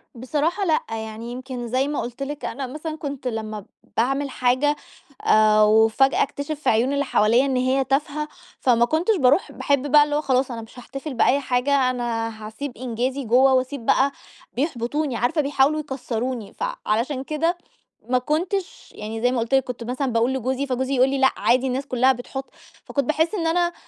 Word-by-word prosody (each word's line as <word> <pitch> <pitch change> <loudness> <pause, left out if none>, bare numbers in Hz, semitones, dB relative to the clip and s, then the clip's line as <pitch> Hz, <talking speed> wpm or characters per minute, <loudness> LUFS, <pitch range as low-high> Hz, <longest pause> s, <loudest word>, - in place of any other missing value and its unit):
بصراحة 305 - -1
لأ، 320 -3 +2
يعني 220 +1 -6
يمكن 255 -1 -6
زي 260 +4 +1
ما 295 - -2
قُلت 245 +3 -5
لِك 290 +1 -5
أنا 265 +2 -4
مثلًا 310 +4 -5
كنت 280 -4 -5
لمّا 215 -3 -4 0.3
باعمل 270 +4 +1
حاجة، 255 +4 +1 0.5
آآ، 215 0 +5
وفجأة 220 +5 +4
أكتشِف 285 +2 -5
في - - +1
عيون 240 +5 +2
اللي 285 0 0
حواليّا 235 +2 +3
إن 270 - 0
هي 260 +2 +2
تافهة، 290 +3 -1 0.3
فما 235 -3 +4
كنتش 330 - +1
باروح 280 +3 +3
باحب 280 0 0
بقى 295 0 +8
اللي 295 0 -2
هو 300 - +1
خلاص 260 -2 +1
أنا 230 -1 -5
مش 225 +3 -12
هاحتفل 275 +4 -7
بأي 255 +3 +3
حاجة، 260 0 +1
أنا 235 -2 -2 0.2
هاسيب 265 +4 -7
إنجازي 255 +3 -2
جوه 255 +4 +4
وأسيب 255 -1 -1
بقى 275 +1 +3 0.4
بيحبطوني، 275 0 -1
عارفة 275 +8 +1
بيحاولوا 280 +1 +2
يكسّروني. 250 -5 -4
فعلشان 270 - -2
كده 330 +4 -1 0.5
ما 255 - +3
كنتش 345 +8 -2
يعني 220 +1 -6
زي 245 +1 +3
ما 255 - 0
قُلت 230 +3 -3
لِك 265 0 +5
كنت 245 -2 -6
مثلًا 255 +2 -2
باقول 235 +3 +2
لجوزي، 265 +2 -1
فجوزي 260 +1 -1
يقول 255 +1 +4
لي: 275 - -1
"لأ، 265 0 +4
عادي 255 +2 +2
الناس 265 +2 -2
كلّها 255 0 +3
بتحط"، 265 +2 -6 0.4
فكنت 280 -2 -1
باحس 320 - +1
إن 330 -4 -1
أنا 345 +1 +1
265 Hz, 180 wpm, -23 LUFS, 245-285 Hz, 0.5 s, بقى